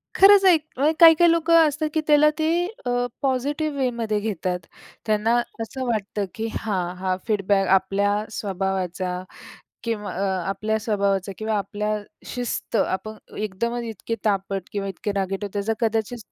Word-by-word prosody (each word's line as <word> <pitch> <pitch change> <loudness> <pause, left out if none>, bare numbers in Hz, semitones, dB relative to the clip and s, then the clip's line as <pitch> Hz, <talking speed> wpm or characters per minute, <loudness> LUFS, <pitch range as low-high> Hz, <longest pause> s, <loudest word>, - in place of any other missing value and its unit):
खरंच 395 0 +7
आहे. 360 -3 +7 0.2
म्हणजे 295 +4 +3
काही-काही 335 0 +8
लोकं 335 0 +3
असतात 305 +1 -2
की 315 - +1
त्याला 300 0 +6
ते 330 +3 +2 0.2
अ, 245 0 +1 0.2
पॉझिटिव्ह 285 +3 -1
वेमध्ये 235 -5 0
घेतात. 185 -4 -2 0.5
त्यांना 215 +2 +2 0.3
असं 255 +4 -4
वाटतं 210 -3 -1
की 225 +1 -3
हां, 185 -5 -2
हा, 185 0 -1
फीडबॅक 200 -2 +2
आपल्या 200 +2 +2
स्वभावाचा 185 -3 -2 0.6
किंव 225 -3 -3
अ - - -4 0.4
आपल्या 215 +3 -1
स्वभावाचा 200 -3 0
किंवा 220 0 -1
आपल्या 210 +2 -2 0.3
शिस्त 245 -1 -4
आपण 205 +1 -1 0.2
अ - - -12
एकदमच 235 +4 -2
इतके 230 0 -4
तापट 195 -2 0
किंवा 200 -1 -3
इतके 195 +2 -4
रागीट 195 +1 -2
आहोत 205 0 -6
याचा 205 +2 0
कदाचित 225 +1 0
215 Hz, 145 wpm, -23 LUFS, 195-245 Hz, 0.6 s, काही-काही